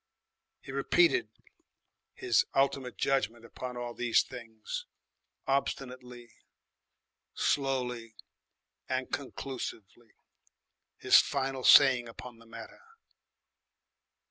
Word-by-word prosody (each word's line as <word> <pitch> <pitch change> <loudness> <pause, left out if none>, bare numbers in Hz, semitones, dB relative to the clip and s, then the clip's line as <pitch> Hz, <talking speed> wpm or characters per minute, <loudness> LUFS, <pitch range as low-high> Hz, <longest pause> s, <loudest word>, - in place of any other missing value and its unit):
He - - -10
repeated 355 +1 +2 0.9
his 370 0 +2
ultimate 135 -2 0
judgment 120 -4 -1
upon 125 +1 -7
all 120 -1 -5
these 115 -1 +2
things, 115 -3 -8 0.6
obstinately, 125 -3 -3 1.0
slowly, 125 -5 -1 0.7
and 130 0 -2
conclusively, 120 -5 -6 0.8
his - - +6
final 135 -1 -2
saying 130 -4 +7
upon 115 0 -11
the 115 - -18
matter. 115 0 -11
125 Hz, 80 wpm, -30 LUFS, 115-135 Hz, 1.0 s, saying